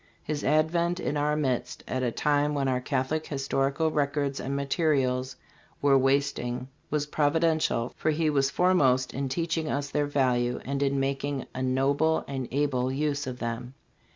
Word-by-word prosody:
His 150 -1 -3
advent 170 +4 +2
in 150 - -2
our 150 +1 +1
midst 135 -5 -2
at 130 - -2
a 125 - +1
time 150 +2 +1
when 140 -1 0
our 125 -1 0
Catholic 130 +5 -1
historical 140 +2 0
records 140 -2 0
and 135 +1 -3
materials 135 -3 0 0.4
were 140 -1 +4
wasting 135 -2 +1 0.2
was 150 -1 0
providential, 155 -4 +1
for 155 - -1
he 155 +1 +1
was 140 -2 +2
foremost 140 -8 +3
in 135 0 -2
teaching 165 +1 -1
us 140 0 -2
their 145 -1 +1
value 125 -3 +1
and 140 +1 -2
in 140 -1 +1
mak 135 0 -1
ing 140 -2 -2
a 130 - -4
noble 140 +5 +1
and 135 -3 -4
able 130 -2 0
use 145 0 -1
of 125 -1 -4
them. 120 +2 -5
140 Hz, 165 wpm, -27 LUFS, 130-150 Hz, 0.4 s, were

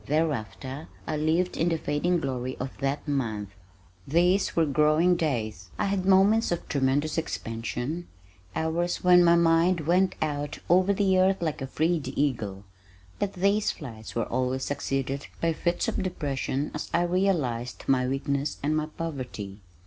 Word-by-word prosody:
Thereafter 135 -3 -2 0.2
I 155 - -2
lived 160 +4 +1
in 170 - +1
the 165 - +1
fading 160 +4 0
glory 130 -2 -3
of 130 +1 -5
that 140 +2 -2
month. 110 -8 -1 0.6
These 175 +6 +2
were 165 - +4
growing 155 +4 +3
days! 110 - -2
I - - 0
had 195 -1 -1
moments 195 +3 +5
of 175 - -2
tremendous 145 +3 +1
expansion, 120 +4 -4 0.5
hours 170 +2 -1
when 180 -1 +7
my 170 0 +6
mind 170 +1 +3
went 180 +4 +2
out 145 -2 -2
over 185 +3 +5
the 190 -2 +3
earth 190 +1 +3
like 155 -4 -2
a 135 - -3
freed 160 +3 0
eagle, 110 -9 -1 0.6
but 205 -1 -1
these 200 +3 +2
flights 115 -8 -7
were 115 - 0
always 130 +1 -1
succeeded 135 -1 -2
by 165 -1 +1
fits 175 +2 -1
of - - -1
depression 145 -5 -2
as 150 - -5
I 170 - +2
realized 170 -10 0
my 130 -2 +2
weakness 140 +2 -1
and 150 +2 +1
my 155 0 0
poverty. 130 -11 -6
155 Hz, 155 wpm, -27 LUFS, 130-175 Hz, 0.6 s, when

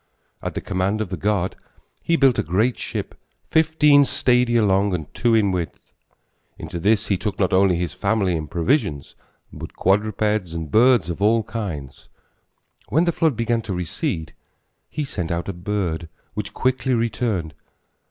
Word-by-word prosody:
At - - -5
the - - -2
command 95 +2 -1
of 110 -4 -2
the 95 - -3
god 95 +1 -1 0.5
he 170 - +1
built 135 -6 +4
a - - +1
great 105 +10 +1
ship - - -4 0.4
fifteen 155 -2 +5
stadia 125 -4 +2
long 100 -1 +2
and 80 -4 -7
two 120 -2 +2
in 105 -3 +3
width. 85 -5 -5 0.6
Into 85 - -6
this 105 +3 +2
he 100 -3 +1
took 105 -3 -3
not 95 0 +1
only 95 -1 +4
his 85 -2 -2
family 100 -1 0
and 75 -2 -4
provisions, 85 - 0 0.4
but - - -9
quadrupeds 105 -2 0
and 80 -3 -5
birds 115 -7 +4
of 85 - -7
all 110 +2 +3
kinds. 90 - -6 0.8
When 160 +5 +3
the 170 - +2
flood 160 -4 +1
began 115 0 0
to 100 -4 -4
recede, 85 -2 -3 0.6
he 150 -1 -3
sent 90 -11 -4
out 85 0 -2
a 100 - -3
bird, 85 -3 -3 0.2
which 105 +1 -4
quickly 130 0 +1
returned. 110 -8 -1
100 Hz, 160 wpm, -22 LUFS, 90-115 Hz, 0.8 s, fifteen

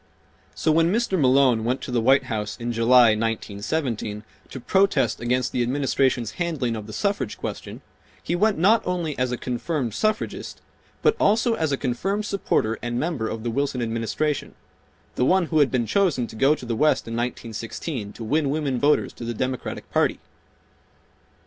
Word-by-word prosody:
So 160 - +1
when 165 +2 +3
Mr. 225 -2 +1
Malone 130 -6 +4
went 125 +3 0
to - - -6
the 120 -2 +1
White 135 +3 +4
House 110 -5 -4
in 120 0 -3
July, 120 +1 +5
1917, 110 +1 -2 0.3
to 130 - -7
protest 195 +9 +2
against 125 +1 0
the 125 - -1
Administration's 130 -2 +1
handling 140 -9 -1
of 105 -1 -7
the - - -8
suffrage 200 - -2
question, - - -6 0.4
he 175 - -1
went 210 +3 +2
not 205 +7 +4
only 175 -5 -2
as 125 -1 0
a 125 - -2
confirmed 125 0 -3
suffragist, 215 - -2 0.4
but 445 - +4
also 225 +3 +3
a5 160 -6 -1
a - - +1
confirmed 195 +12 -2
supporter 115 - 0
and 120 0 -2
member 150 -9 -1
of 110 0 -5
the 120 - -2
Wilson 140 +1 -1
Administration—the 115 +6 -2 0.7
one 185 +6 +3
who 155 -1 +1
had 145 -3 +4
been 125 -3 0
chosen 170 - +1
to 110 - -11
go 135 +6 +4
to 130 - -10
the 115 -1 -2
West 150 +2 +2
in 115 - -5
1916 115 0 -4
to 115 - -8
win 145 +5 +1
women 140 -4 -1
voters 145 +3 +2
to - - -9
the 115 0 -4
Democratic 130 +1 -4
Party. - - +2
130 Hz, 175 wpm, -24 LUFS, 115-160 Hz, 0.7 s, July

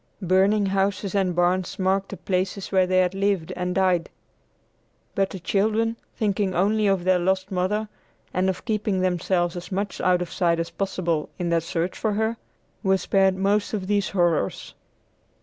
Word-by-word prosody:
Burning 195 +3 +3
houses 195 0 0
and 190 -3 +1
barns 175 +2 +1
marked 190 0 0
the - - -7
places 190 +1 -2
where 190 -2 +3
they 185 0 +2
had 185 0 +3
lived 195 -3 0
and 180 0 -2
died. 185 -3 +2 1.0
But 195 -1 +1
the 190 - -7
children, 220 +5 +1 0.2
thinking 200 -3 0
only 210 +3 +2
of 195 -3 +1
their 185 0 +3
lost 190 +2 0
mother, 195 +4 0 0.5
and 185 +1 +1
of 185 - -4
keeping 210 -3 0
themselves 180 -1 0
as 175 +1 -7
much 200 +1 -3
out 180 -1 +3
of 175 - -10
sight 170 -2 +1
as 165 - -3
possible 175 -5 -2
in 175 -1 -2
their 170 -1 +2
search 165 +2 -2
for 215 -2 -1
her, 220 +2 0 0.4
were 190 -2 +3
spared 190 0 +2
most 200 +3 +1
of 195 -3 -4
these 205 0 +1
horrors. 175 - 0
190 Hz, 170 wpm, -24 LUFS, 180-200 Hz, 1.0 s, Burning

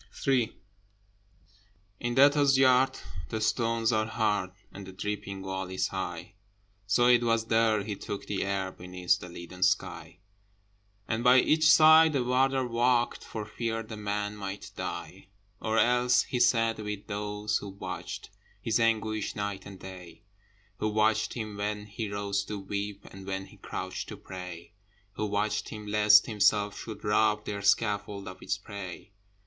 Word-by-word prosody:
III 130 -5 +1 1.4
In 120 0 -2
Debtors' 140 0 +5
Yard 130 0 +4 0.3
the 110 - -2
stones 115 +1 +1
are 110 -1 +1
hard, 105 -4 0 0.2
And 100 -1 -10
the - - -8
dripping 100 0 -5
wall 95 -1 -4
is 95 0 -1
high, 90 -1 -5 0.5
So 115 +4 +3
it 120 -1 +6
was 115 -1 +1
there 110 -2 +2
he 105 0 -4
took 100 +1 -6
the 100 - -2
air 100 -1 -2
Beneath 90 -1 -1
the 90 - -9
leaden 85 +1 -10
sky, 95 +2 0 0.9
And 115 0 -1
by 125 +1 +7
each 155 +3 +4
side 160 0 +7
a 130 - +2
Warder 130 +1 +2
walked, 120 0 +1
For 110 -2 -6
fear 115 +1 -3
the 110 0 -8
man 105 0 -3
might 100 -1 -6
die. 95 +2 -6 0.3
Or 110 +1 0
else 125 +1 +4
he 125 - -3
sat 115 -2 +3
with 105 -1 -5
those 105 0 -2
who 100 - -7
watched 95 -1 -7 0.3
His 115 0 0
anguish 110 -2 0
night 100 -2 -4
and 100 -2 -10
day; 90 -2 -11 0.6
Who 110 - 0
watched 110 0 +1
him 110 -4 -5
when 105 0 -3
he 105 +1 -5
rose 100 0 -1
to 105 - -5
weep, 100 +1 -5
And 95 0 -11
when 95 0 -3
he 95 - -17
crouched - - -5
to - - -7
pray; 90 0 -9 0.4
Who 105 +1 -3
watched 105 +1 -1
him 105 -1 -8
lest 105 0 +6
himself 105 -1 +2
should 110 +1 -8
rob 105 0 +2
Their 100 -1 -4
scaffold 100 -1 +1
of 95 0 -9
its - - -2
prey. 100 -1 -8
105 Hz, 160 wpm, -29 LUFS, 100-115 Hz, 1.4 s, by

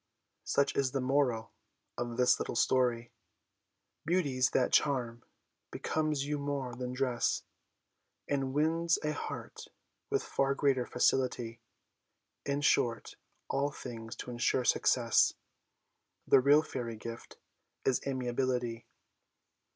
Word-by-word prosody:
Such 140 - +1
is 135 -2 +1
the 135 - 0
moral 130 -4 +1 0.4
of 120 -1 -4
this 125 -1 +4
little - - -3
story 120 -1 +1 0.9
Beauties, 145 -7 +1
that 130 - +1
charm 120 -5 +1 0.5
becomes 155 -3 -1
you 145 0 -2
more 140 -3 -3
than 125 +1 -4
dress, 130 -2 0 0.8
And 135 -2 -1
wins 165 +4 +2
a 150 0 0
heart - - -6 0.4
with - - 0
far 135 0 0
greater 135 -3 +1
facility. 125 -2 0 0.9
In 140 +1 0
short, 120 -5 +1
in - - -29 0.3
all 140 +1 +1
things 115 -4 -8
to 125 - -7
ensure 120 +1 +1
success, 120 -2 +3 0.9
The 135 - +6
real 145 +4 +5
Fairy 120 -6 -5
gift 115 +2 -9 0.5
is 130 - +2
Amiability! 125 -2 -1
130 Hz, 115 wpm, -32 LUFS, 120-140 Hz, 0.9 s, The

